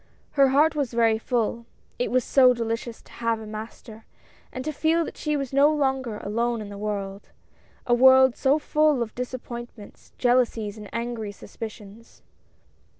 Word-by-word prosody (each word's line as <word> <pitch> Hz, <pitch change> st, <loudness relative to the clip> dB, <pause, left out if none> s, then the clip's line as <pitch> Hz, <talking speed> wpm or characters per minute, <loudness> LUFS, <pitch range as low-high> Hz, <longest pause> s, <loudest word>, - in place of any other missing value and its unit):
Her 275 Hz, -2 st, +4 dB
heart 295 Hz, +4 st, +4 dB
was 280 Hz, -5 st, -2 dB
very 225 Hz, -2 st, +3 dB
full 235 Hz, 0 st, -2 dB, 0.2 s
— -, -, -37 dB
it 245 Hz, -, 0 dB
was 255 Hz, 0 st, +2 dB
so 255 Hz, -1 st, +5 dB
delicious 230 Hz, 0 st, -4 dB
to -, -, -20 dB
have 230 Hz, -1 st, -1 dB
a 220 Hz, -, -9 dB
master, 215 Hz, +1 st, -9 dB, 0.4 s
and 255 Hz, +1 st, -6 dB
to 310 Hz, -, -1 dB
feel 320 Hz, +3 st, +1 dB
that -, -, -8 dB
she 300 Hz, -1 st, -1 dB
was 275 Hz, -2 st, -4 dB
no 280 Hz, +2 st, +5 dB
longer 265 Hz, -6 st, -1 dB
alone 230 Hz, +3 st, -1 dB
in 210 Hz, -1 st, -7 dB
the 200 Hz, -, -8 dB
world 200 Hz, -1 st, -5 dB, 0.3 s
— -, -, -33 dB
a 240 Hz, -, +2 dB
world 260 Hz, +1 st, +6 dB
so 275 Hz, +2 st, +2 dB
full 300 Hz, -3 st, +2 dB
of 220 Hz, -, -9 dB
disappointments, 240 Hz, -3 st, -8 dB
jealousies 240 Hz, -4 st, +1 dB
and 210 Hz, -2 st, -10 dB
angry 230 Hz, -3 st, -4 dB
suspicions. 215 Hz, +1 st, -11 dB
240 Hz, 170 wpm, -25 LUFS, 220-265 Hz, 0.4 s, world